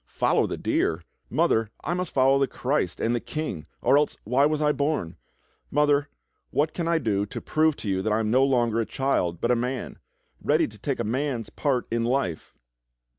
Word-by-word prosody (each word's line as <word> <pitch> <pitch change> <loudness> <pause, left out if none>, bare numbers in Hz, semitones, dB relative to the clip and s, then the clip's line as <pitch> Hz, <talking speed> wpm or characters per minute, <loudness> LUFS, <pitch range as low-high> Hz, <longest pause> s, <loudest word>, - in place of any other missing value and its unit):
"Follow - - +1
the - - -4
deer! 80 +1 0 0.3
Mother, 110 -1 +2
I 170 - -1
must 180 -1 -2
follow 135 +1 +4
the 135 - +2
Christ 130 - -1
and 115 - +1
the 120 - +1
King, 150 - -5 0.2
or 140 - +5
else 150 - -1
why 130 +6 +3
w^as 155 0 -1
I 150 -1 +3
born.? 140 - -1 0.5
Mother, 145 0 +2 0.4
what 150 +2 0
can 170 -2 -2
I 170 0 +3
do 105 -8 0
to - - -6
prove 155 -1 +2
to 110 - -8
you 95 -1 0
that 110 - -1
I 110 - +2
am 110 -1 0
no 130 +3 +5
longer 120 -4 +2
a 115 - +1
child 90 -11 0
but 120 - +1
a - - +4
man, 125 +2 -3 0.4
ready - - +2
to 105 - -14
take 135 +4 -2
a - - 0
man's 125 +1 -2
part 130 -4 0
in 115 0 0
life?" 115 - -1
130 Hz, 205 wpm, -26 LUFS, 110-145 Hz, 0.5 s, or